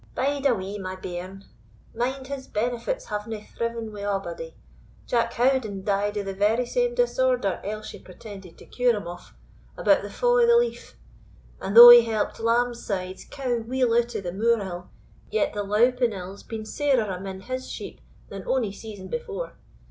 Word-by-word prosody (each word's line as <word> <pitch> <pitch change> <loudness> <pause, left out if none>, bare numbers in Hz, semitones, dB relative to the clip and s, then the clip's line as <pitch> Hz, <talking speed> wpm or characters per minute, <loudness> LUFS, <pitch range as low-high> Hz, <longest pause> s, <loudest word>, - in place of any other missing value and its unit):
"Bide 280 +1 +1
a 250 - +3
wee, 195 +1 -5
my 185 -1 -5
bairn; 185 +1 -7 0.5
mind 260 +3 -2
his 270 -1 -6
benefits 240 - -2
havena 210 0 -5
thriven 230 -2 -4
wi' 205 - -7
a'body. 205 - -4 0.5
Jock 235 -1 0
Howden 240 -6 +1
died 205 +1 0
o' 205 - -1
the 195 0 -4
very 215 +5 +2
same 485 - 0
disorder - - +1
Elshie 215 +1 -6
pretended 190 -1 -11
to - - -14
cure 245 -2 +1
him 205 - -5
of, 175 0 -10 0.4
about - - +4
the - - -7
fa' - - -5
o' 485 0 +5
the 470 0 +6
leaf; 475 0 -2 0.6
and 200 +3 -2
though 240 +1 +14
he 240 0 +11
helped 225 -2 -2
Lambside's 230 -5 -1
cow 255 -3 -2
weel 245 +1 0
out 240 0 +1
o' - - -2
the 175 -2 -5
moor 230 +3 +2
ill, 180 -2 -7 0.4
yet 215 - 0
the 205 - -2
louping 235 +4 +2
ill's 190 +1 -8
been 220 -1 -7
sairer 265 -1 +1
amane; 190 0 -6
his 255 +4 -5
sheep - - -8 0.3
than 195 -1 -8
ony 250 -6 0
season 205 -2 -9
before. 185 -6 -5
225 Hz, 170 wpm, -25 LUFS, 195-250 Hz, 0.6 s, though